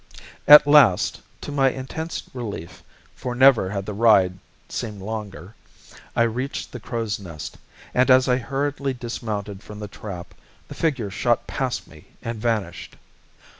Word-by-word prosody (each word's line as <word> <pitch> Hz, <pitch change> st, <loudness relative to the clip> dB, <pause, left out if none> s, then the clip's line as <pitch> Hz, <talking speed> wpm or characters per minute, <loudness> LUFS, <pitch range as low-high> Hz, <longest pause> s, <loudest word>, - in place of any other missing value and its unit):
At 150 Hz, 0 st, +11 dB
last, 145 Hz, -11 st, +5 dB, 0.2 s
to -, -, -6 dB
my 135 Hz, -2 st, +3 dB
intense 135 Hz, +6 st, -5 dB
relief 100 Hz, -9 st, -7 dB, 0.3 s
for 125 Hz, -1 st, -5 dB
never 130 Hz, -7 st, +5 dB
had 100 Hz, -1 st, -4 dB
the 105 Hz, -, -5 dB
ride 100 Hz, -4 st, +4 dB, 0.3 s
seemed 105 Hz, -4 st, -5 dB
longer 100 Hz, -3 st, -6 dB, 0.6 s
I 115 Hz, -, +4 dB
reached 125 Hz, +4 st, -3 dB
the 125 Hz, -, -7 dB
Crow's 110 Hz, -2 st, -3 dB
Nest, 85 Hz, -6 st, -8 dB, 0.3 s
and 130 Hz, +2 st, +3 dB
as 130 Hz, 0 st, +6 dB
I 125 Hz, -1 st, +3 dB
hurriedly 140 Hz, +1 st, -2 dB
dismounted 110 Hz, -5 st, -5 dB
from 105 Hz, -, -11 dB
the 105 Hz, 0 st, -6 dB
trap, 95 Hz, -3 st, -8 dB, 0.3 s
the -, -, -9 dB
figures 125 Hz, -, -1 dB
shot -, -, +1 dB
past -, -, -3 dB
me -, -, -16 dB, 0.2 s
and 115 Hz, -2 st, -5 dB
vanished. 110 Hz, -7 st, -2 dB
115 Hz, 145 wpm, -23 LUFS, 100-130 Hz, 0.6 s, At